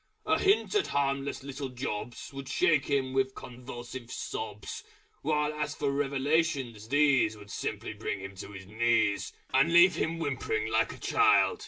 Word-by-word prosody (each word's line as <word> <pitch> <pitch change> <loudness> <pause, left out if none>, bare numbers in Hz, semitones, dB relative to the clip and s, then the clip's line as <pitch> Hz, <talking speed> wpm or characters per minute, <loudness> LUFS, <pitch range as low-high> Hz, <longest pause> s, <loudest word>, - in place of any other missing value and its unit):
A - - +2
Hint 400 +2 +3
at 415 -2 +2
harmless 140 0 -1
little 140 0 -5
jobs 125 -1 -5
Would 135 -1 -7
shake 155 -2 +3
him 135 -2 0
with 130 0 +1
convulsive 120 0 -8
sobs. - - -5 0.4
While 150 0 +1
as 150 0 -3
for 140 -2 0
Revelations, 140 -4 0
these 140 -5 +3
Would 105 -1 -12
simply - - -4
bring 100 - -4
him 95 +1 -7
to 100 - -8
his 95 0 -9
knees, 110 0 +1 0.2
And 135 +5 +4
leave 175 +2 +7
him 165 +1 -1
whimpering 165 - -2
like - - +2
a - - -11
child. 425 0 +3
140 Hz, 160 wpm, -29 LUFS, 120-150 Hz, 0.4 s, leave